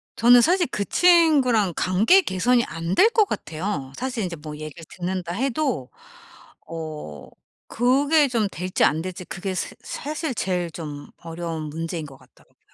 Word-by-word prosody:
저는 240 +1 +6
사실 350 +6 +3
그 200 - -1
친구랑 285 - +4
관계 215 - +4
개선이 235 - +2
안 165 +3 -4
될 445 - +6
것 440 -3 +4
같아요. 155 - -4
사실 250 -4 -3
인제 175 -2 -4
뭐 150 0 -8
얘기를 155 +1 -9
듣는다 180 -1 -4
해도 255 - -1 0.8
어 155 - -7 0.4
그게 280 +5 +3
좀 230 -5 0
될지 180 +2 -1
안 155 +3 +3
될지 180 +1 -7
그게 190 +2 -5
새 - - -4
사실 300 -1 -4
제일 180 -4 -2
좀 150 -3 -7 0.2
어려운 165 -1 -5
문제인 165 +1 -5
것 140 -2 -12
같더라고요. - - -25
185 Hz, 285 characters per minute, -23 LUFS, 165-255 Hz, 0.8 s, 저는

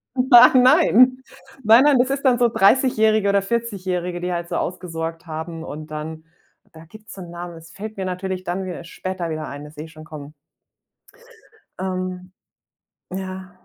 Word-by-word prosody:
Nein, 250 0 +7
nein, 255 +1 +5 0.4
nein, 225 +5 +7
nein, 290 -2 +5
das 255 +1 +2
ist 275 +1 -2
dann 250 -2 +4
so 240 -1 +3
Dreißigjährige 220 -2 +3
oder 200 0 +3
Vierzigjährige, 185 -5 -3
die 180 0 -3
halt 170 0 -4
so - - -3
ausgesorgt 165 -1 -5
haben 160 0 -6
und 155 0 -8
dann 155 +1 -7 0.5
da 160 0 -14
gibt's 215 +5 -14
so 190 - -9
'n 175 - -9
Namen. 175 0 -8
Das 165 +1 -14
fällt 215 +1 -8
mir 190 - -3
natürlich 185 0 -4
dann 185 +1 -3
wieder 180 -2 -6
später 175 0 -5
wieder 155 -1 -4
ein, 145 +1 -8
das 150 - -14
seh 150 - -7
ich 160 - -14
schon 155 0 -13
kommen. 150 -2 -10 1.5
Ähm. 185 -1 -4 0.8
Ja, 190 0 -6
185 Hz, 170 wpm, -21 LUFS, 165-215 Hz, 1.5 s, Nein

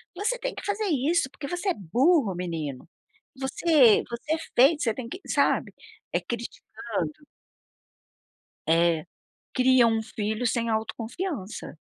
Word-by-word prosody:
"Você 425 +7 -1
tem - - -3
que - - -8
fazer 415 +1 -1
isso 300 +1 +1
porque 280 - -7
você 355 +5 -2
é - - +3
burro, 235 - +2
menino. 160 -7 -4 0.5
Você 265 -3 +4
você 235 +6 -3
é - - +1 0.2
feio 275 +6 +6
você 230 -6 +1
tem 235 +1 -6
que", 365 - -7
sabe. - - +1 0.4
Eh, - - +1
criticando 235 0 -5 1.6
É. 165 0 +3 0.5
Cria 255 -1 +5
um 225 -1 +1
filho 220 +2 -3
sem 230 0 0
autoconfiança. 225 - -4
240 Hz, 130 wpm, -26 LUFS, 215-315 Hz, 1.6 s, feio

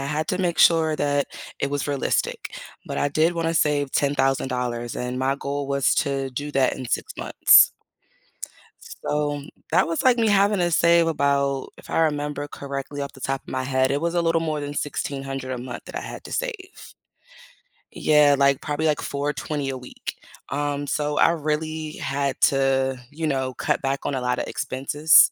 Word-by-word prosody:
I 135 - -3
had 155 +2 -1
to 185 - 0
make 175 -2 0
sure 160 -2 +5
that 145 -1 +1 0.3
it 140 - 0
was 145 0 -2
realistic, 140 -2 -1 0.3
but - - -4
I 145 - +2
did 155 +4 +2
wanna 165 -1 -1
save 145 -3 +1
$10,000 130 -4 0
and 125 +1 -3
my 135 +1 +1
goal 140 0 -4
was 140 -1 +2
to 135 -2 0
do 145 +3 -5
that 135 -2 +2
in 130 - -6
6 - - -2
months. - - +6 1.1
So, 145 -1 -3 0.3
that - - +4
was 165 0 -1
like 255 -2 +5
me 230 -2 +2
having 200 0 +3
to 175 -1 +1
save 170 0 +4
about, 140 -3 +1
if - - -13
I - - +1
remember 145 -2 -1
correctly 140 0 -5
off 140 - -5
the 135 - -15
top 135 +1 -2
of - - -29
my 130 - -2
head, 130 0 +1
it 140 +1 0
was 170 +1 -1
a 175 - +2
little 165 0 +2
more 155 -2 -2
than 145 0 -4
$1,600 135 -2 -3
a 125 - -3
month 125 -1 -7
that - - -8
I - - -2
had - - -8
to - - -9
save. 440 -6 -5 1.0
Yeah, 150 -2 +4
like, 140 -1 +3
probably, 150 +1 -2
like, 150 - +1
$420 145 0 -3
a 135 - -3
week. 125 - -8 0.3
Um, 145 0 -2
so 150 +1 -1
I - - +5
really 155 0 -2
had 140 0 -2
to, 135 -1 +2
you 160 +2 -3
know, 130 -3 -1
cut - - -1
back 135 0 -2
on - - -1
a 130 - -2
lotta 125 0 -1
expenses. 145 +4 +4
145 Hz, 185 wpm, -24 LUFS, 135-155 Hz, 1.1 s, months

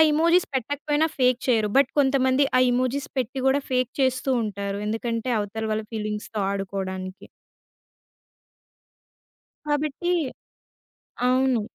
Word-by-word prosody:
Emojis 335 +3 +4
పెట్టకపోయినా 290 +4 0
fake 250 -1 +3
చేయరు. 225 -4 +2
But 280 - +5
కొంతమంది 265 0 +3
ఆ - - +6
ఎమోజిస్ 255 +3 -1
పెట్టి 260 +1 -2
గూడా 275 +2 +3
ఫేక్ 255 -1 +1
చేస్తూ 260 0 +1
ఉంటారు. 200 -1 -3
ఎందుకంటే 230 +2 -2
అవతల 210 +2 -3
వాళ్ళ 215 0 -1
ఫీలింగ్స్‌తొ 215 0 -4
ఆడుకోడానికి. 190 -1 -4 2.4
కాబట్టి 295 +3 -1 1.2
అవును. 255 -2 +3
255 Hz, 100 wpm, -24 LUFS, 215-275 Hz, 2.4 s, ఆ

